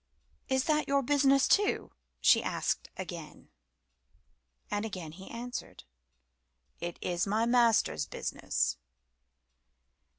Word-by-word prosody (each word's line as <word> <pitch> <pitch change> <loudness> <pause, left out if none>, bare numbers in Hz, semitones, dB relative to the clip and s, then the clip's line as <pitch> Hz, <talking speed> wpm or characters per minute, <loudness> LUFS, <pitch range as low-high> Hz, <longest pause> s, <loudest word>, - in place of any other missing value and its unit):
"Is 265 0 +2
that 305 0 +1
your 280 0 +2
business 275 0 +4
too?" 410 0 +2 0.3
she - - +6
asked - - -2
again. - - -8 1.2
And 205 0 0
again 185 -8 -5
he 190 +4 -11
answered 245 +1 -7 1.0
"It 175 0 -5
is 175 +1 0
my 215 +3 +2
Master's 235 -2 +3
business." 65 +1 -1
235 Hz, 100 wpm, -31 LUFS, 185-275 Hz, 1.2 s, she